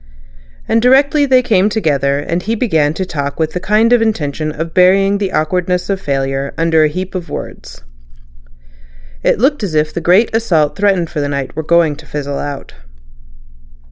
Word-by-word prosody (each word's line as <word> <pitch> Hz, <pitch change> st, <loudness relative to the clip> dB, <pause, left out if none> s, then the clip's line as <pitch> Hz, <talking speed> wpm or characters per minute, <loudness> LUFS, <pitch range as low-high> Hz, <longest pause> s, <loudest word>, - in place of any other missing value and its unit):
And 225 Hz, -, +2 dB
directly 280 Hz, +4 st, +3 dB
they 255 Hz, -1 st, +4 dB
came 205 Hz, -3 st, +2 dB
together 145 Hz, -8 st, 0 dB, 0.2 s
he 220 Hz, +5 st, -2 dB
began 160 Hz, -10 st, 0 dB
to 190 Hz, -, -3 dB
talk 140 Hz, -4 st, -5 dB
with 160 Hz, -1 st, 0 dB
the 180 Hz, -, -2 dB
kind 215 Hz, +5 st, +2 dB
intention 160 Hz, -10 st, 0 dB
of 165 Hz, +2 st, -6 dB
burying 195 Hz, +2 st, +3 dB
the 195 Hz, -2 st, -2 dB
awkwardness 180 Hz, +4 st, -1 dB
of 195 Hz, -1 st, -2 dB
failure 135 Hz, -2 st, -2 dB
under 165 Hz, -1 st, +2 dB
a -, -, +4 dB
heap 185 Hz, +5 st, -5 dB
of 180 Hz, -2 st, -5 dB
words. -, -, -8 dB, 1.4 s
It -, -, +2 dB
looked 270 Hz, +6 st, +1 dB
as 190 Hz, -7 st, -3 dB
if 155 Hz, 0 st, 0 dB
the 170 Hz, -, -4 dB
great 190 Hz, +7 st, +3 dB
assault 165 Hz, -10 st, +1 dB
threatened 195 Hz, -5 st, 0 dB
for 150 Hz, -, -3 dB
that 145 Hz, -, -2 dB
night 140 Hz, -2 st, -4 dB
were 160 Hz, -, -2 dB
going 165 Hz, -1 st, +2 dB
to 155 Hz, -, -14 dB
fizzle 145 Hz, -1 st, -4 dB
out. 145 Hz, -1 st, -6 dB
170 Hz, 175 wpm, -15 LUFS, 150-205 Hz, 1.4 s, they